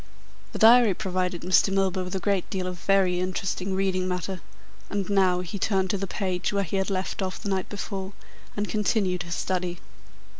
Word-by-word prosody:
The - - -5
diary 230 -3 +7
provided 185 -3 -2
Mr. 185 +2 +4
Milburgh 190 -1 +1
with 180 - -5
a - - 0
great 195 -1 0
deal 185 -2 -2
of 180 -1 -5
very 190 -2 +2
interesting 185 +1 -2
reading 190 -1 0
matter, 180 0 -3 0.5
and 200 -2 -2
now 185 -3 +3
he 180 +3 -6
turned 190 -2 +1
to 200 - 0
the 195 - -3
page 185 -2 -2
where 200 -1 +1
he 195 +2 -2
had 190 +1 0
left 190 +1 -2
off 185 -1 -2
the 200 - -4
night 190 -1 -1
before 195 -1 -5 0.4
and 205 0 -1
continued 200 -4 0
his 170 0 -4
study. 180 -1 -2
190 Hz, 190 wpm, -26 LUFS, 180-195 Hz, 0.5 s, diary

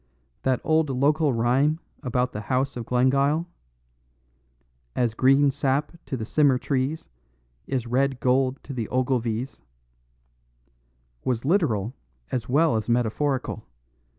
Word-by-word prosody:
"That 130 -2 +1
old 160 -1 +2
local 145 +3 +2
rhyme 130 +6 +2 0.2
about 125 -2 0
the 105 - -5
house 130 +4 -1
of 120 -2 -6
Glengyle 140 +6 +2 1.5
As 120 -3 +1
green 135 +3 +4
sap 135 +2 0 0.2
to 130 - -3
the 110 - -4
simmer 140 +1 +3
trees 135 +4 -2 0.6
Is 125 -3 -2
red 130 +2 0
gold 130 +1 +2
to 140 - -7
the 115 -4 -4
Ogilvies 125 -1 -1 1.6
was 125 -1 -1
literal 130 - +1 0.4
as 125 -2 -3
well 150 -1 +3
as 110 +1 -4
metaphorical. 125 0 0
130 Hz, 120 wpm, -25 LUFS, 120-140 Hz, 1.6 s, green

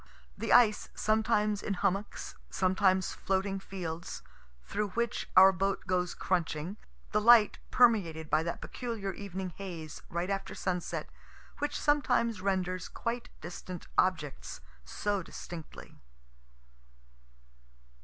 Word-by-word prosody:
The - - -3
ice, 220 -4 +5
sometimes 215 -1 +2
in 200 - -2
hummocks, 195 +3 -2 0.2
sometimes 185 0 +2
floating 195 0 -1
fields, 175 -3 -6 0.4
through 210 - -1
which 235 -1 -1
our 190 +1 +10
boat 195 +1 -1
goes 180 -1 0
crunching. 175 +1 -1 0.3
The 210 - +2
light 230 -1 +7
permeated 190 -11 +3
by 155 +1 +3
that 170 +1 -4
peculiar 225 -6 -4
evening 190 -1 -5
haze, 170 -6 -7
right 175 +3 -2
after 195 0 -3
sunset, 180 -2 -3 0.5
which 290 +1 -1
sometimes 245 -8 +2
renders 185 -2 -1
quite 235 +1 -4
distant 175 +1 -7
objects 155 -6 0 0.3
so 205 -1 -1
distinctly. 165 -1 -9
190 Hz, 110 wpm, -31 LUFS, 180-210 Hz, 0.5 s, our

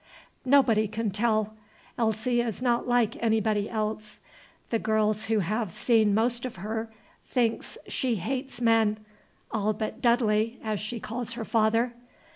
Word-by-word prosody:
"Nobody 245 -6 +4
can 215 0 -2
tell. 215 0 +1 0.4
Elsie 235 +2 +1
is 230 -4 -3
not 245 -1 +1
like 240 -2 +1
anybody 220 -2 +1
else. 215 -1 -3 0.5
The 230 - +1
girls 215 -1 +1
who 220 -2 +1
have 215 +2 -2
seen 220 0 +3
most 235 +2 +1
of 255 - -5
her 220 +4 -4 0.4
think 235 -3 +1 0.2
she 255 -4 0
hates 255 +7 -4
men, 225 -2 +3 0.5
all 215 0 0
but 215 +1 -5
'Dudley,' 230 -1 +2
as 215 -2 -2
she 225 +2 -4
calls 230 +1 -4
her 230 -1 -5
father. 225 +2 +2
220 Hz, 140 wpm, -27 LUFS, 215-235 Hz, 0.5 s, Nobody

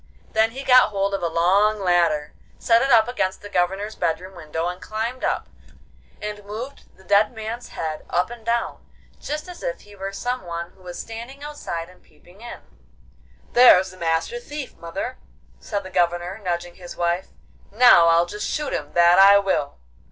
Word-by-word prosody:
Then 220 +1 +3
he 265 +4 -8
got 255 -3 +6
hold 200 -1 -1
of 195 - -2
a 170 - 0
long 195 +6 +2
ladder, 170 -5 +1 0.2
set 230 0 +3
it 270 - +1
up 225 -3 +6
against 190 -7 -2
the 205 - -8
Governor's 195 +3 -1
bedroom 185 +4 -2
window, 160 0 -4
and 180 +1 -5
climbed 230 +4 -4
up - - -1 0.7
and 210 -1 -6
moved 225 +7 -9
the 190 - -19
dead 200 +3 +3
man's 225 +2 -6
head 155 -1 -5
up 180 +6 0
and 240 -2 -10
down, 235 +1 -2 0.4
just 305 +3 -5
as 355 -1 -10
if - - -4
he 205 0 -16
were 195 0 -5
some 245 +5 -3
one 170 -1 -6
who 190 - -24
was 180 -1 -8
standing 235 +5 -8
outside 230 - -5
and 180 0 -19
peeping 175 +6 -21
in. 240 - -9 0.9
'There's 190 -6 +7
the 185 - -15
Master 165 - -1
Thief, 295 - -7
mother!' 190 +9 -6 0.4
said 205 -2 -4
the 190 - -10
Governor, 175 +2 0
nudging 175 -3 -4
his 175 -1 -10
wife. 175 +2 0 0.4
'Now 215 -6 +6
I'll 165 +1 +4
just 210 +4 -5
shoot 300 - -2
him, 145 0 -4
that 175 +1 +5
I 200 +1 +9
will! 190 -8 -1
195 Hz, 180 wpm, -23 LUFS, 175-230 Hz, 0.9 s, I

